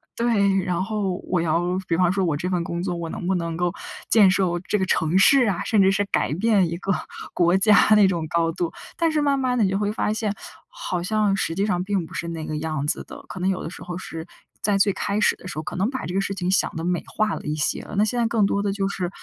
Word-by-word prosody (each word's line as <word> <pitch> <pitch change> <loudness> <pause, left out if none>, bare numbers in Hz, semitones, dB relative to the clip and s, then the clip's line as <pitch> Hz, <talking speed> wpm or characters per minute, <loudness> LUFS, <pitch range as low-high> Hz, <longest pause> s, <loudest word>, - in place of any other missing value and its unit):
对。 205 -5 +2
然 180 -1 -1
后 195 -2 -2
我 180 -2 +1
要 170 +3 0
比 165 - +1
方 180 -1 +3
说 195 -1 0
我 155 -4 0
这 180 +4 -3
份 175 -2 0
工 170 +1 -4
作， 180 -2 -2
我 170 -1 -5
能 175 - -5
不 190 - +2
能 165 -2 -3
够 175 -1 0 0.4
建 205 -4 +6
设 190 0 +2 0.2
这 210 - +1
个 190 - +1
城 165 0 +1
市， 250 +4 +6
啊， 175 - -2
甚 210 -3 +3
至 190 0 +5
是 205 +1 +1
改 - - +1
变 195 -1 +2
一 170 - -4
个 195 +1 -1 0.4
国 175 +1 +3
家 210 +1 +5 0.2
那 205 -2 +6
种 170 -4 -1
高 165 -1 +1
度。 170 -1 -2 0.3
但 330 -1 +2
是 305 -1 +1
慢 280 -1 +2
慢 255 -2 0
的 220 - +3
你 - - +1
就 195 - 0
会 205 0 0
发 215 0 -1
现， 215 -2 -2 0.4
好 - - -4
像 210 0 +1
实 165 -4 -1
际 195 +4 0
上 180 -3 0
并 195 -4 -1
不 - - -14
是 170 - -4
那 160 -2 -5
个 155 - -4
样 155 -2 -3
子 - - -1
的。 - - -11
可 - - -8
能 190 - +1
有 185 - -1
的 - - -5
时 - - -10
候， 175 0 -6
是 165 -3 -7 0.4
在 205 -1 +2
最 200 +1 +3
开 205 +2 -2
始 - - +3
的 185 - -11
时 155 - -7
候， 155 - -3
可 - - -6
能 195 +5 +1
把 260 -1 -4
这 175 - -5
个 195 - +1
事 195 0 -2
情 185 0 -1
想 190 - +1
得 160 - -4
美 175 0 0
化 215 -2 0
了 - - -5
一 150 +1 -2
些。 150 - -2
那 205 - +3
现 240 +3 0
在 230 - +2
更 225 -3 +2
多 200 0 0
的， 200 -1 -1
就 195 -1 -1
是 185 -3 -3
190 Hz, 305 characters per minute, -23 LUFS, 175-205 Hz, 0.4 s, 建